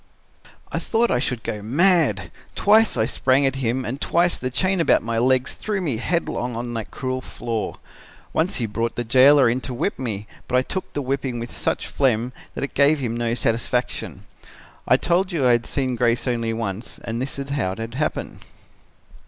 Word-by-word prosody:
"I - - -1
thought 235 +1 +1
I - - +2
should 125 -3 -2
go 105 -3 -4
mad. 130 - +3 0.2
Twice 215 - +4
I 110 - +3
sprang 130 +4 +2
at 135 0 +1
him 125 0 -1
and 130 +5 -4
twice 175 +1 +2
the 130 - -3
chain 185 +9 0
about - - +3
my 115 0 -1
legs 130 +2 +2
threw 210 -2 -3
me 150 -11 -1
headlong 125 -4 -1
on 120 +1 -4
that 115 -2 -4
cruel 130 -1 -3
floor. 115 -4 -4 0.6
Once 165 +4 +1
he 120 - -1
brought 115 +2 -2
the 120 - -2
jailer 130 +3 +6
in 120 +3 +1
to 130 - -5
whip 165 +8 -2
me, 110 -5 -3 0.2
but 125 - +2
I 130 - +3
took 185 +7 -4
the 145 - -2
whipping 135 -1 -2
with 120 0 -6
such - - -1
phlegm 125 -2 0 0.2
that - - -3
it 140 - -4
gave 145 +2 +4
him 120 -5 -2
no 120 0 -1
satisfaction. 120 +2 -1 0.6
I - - +5
told 180 +3 +1
you 155 -7 0
I 125 - +6
had 120 -1 +2
seen 130 -3 -1
Grace 120 +1 +1
only 115 -2 0
once 110 -1 -4
and 115 +1 -3
this 135 +1 -4
is 140 0 -5
how 115 -10 0
it 115 +3 -6
happened. 150 +4 -3
125 Hz, 195 wpm, -23 LUFS, 115-140 Hz, 0.6 s, jailer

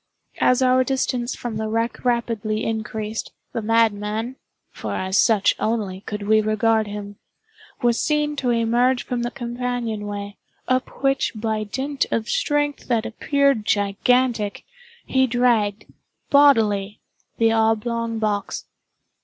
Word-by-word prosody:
As 255 +1 +3
our 255 0 +4
distance 255 -2 -1
from 235 -3 -5
the 220 0 -2
wreck 230 +2 -2
rapidly 230 -3 0
increased, 220 -1 -4 0.2
the 230 - -2
madman 220 +1 +1 0.4
(for - - -5
as 190 0 -2
such 215 -4 +4
only 210 -4 -1
could 210 -1 -4
we 215 0 +5
regard 215 0 +2
him) 205 0 -7 0.7
was 240 -1 +2
seen 300 -1 +1
to 255 -3 0
emerge 240 +2 +2
from 245 -1 -3
the 240 - -1
companion—way, 235 -5 -4 0.3
up 255 +1 -1
which 275 0 +1
by 215 0 -2
dint 270 +6 -2
of 225 -1 -1
strength 290 -11 0
that 235 -3 +1
appeared 275 0 +1
gigantic, 210 +2 +1 0.4
he 260 0 +2
dragged, 225 -4 +1 0.5
bodily, 220 -8 +4 0.4
the 225 -1 +3
oblong 225 +1 0
box. 210 -2 -2
230 Hz, 125 wpm, -22 LUFS, 215-250 Hz, 0.7 s, we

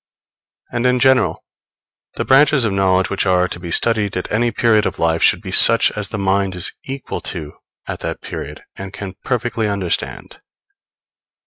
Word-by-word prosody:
And 120 +1 0
in 125 0 +2
general, 130 0 +2 0.7
the - - -3
branches 135 -1 +4
of 105 - -1
knowledge 95 -1 +1
which 100 0 -1
are 90 -1 +2
to 85 - -7
be 85 -1 -8
studied 105 0 +1
at 90 - -5
any 120 +3 +1
period 110 -1 +2
of - - -5
life 80 0 +1
should - - +3
be - - -6
such - - +6
as 105 -2 -4
the 115 - -4
mind 95 -1 0
is 90 - 0
equal 135 0 -6
to 75 -4 -6 0.3
at - - -5
that - - -4
period - - -8
and 95 0 -8
can 95 -2 -7
perfectly 120 -3 -1
understand. 100 -4 -3
100 Hz, 175 wpm, -18 LUFS, 95-120 Hz, 0.7 s, such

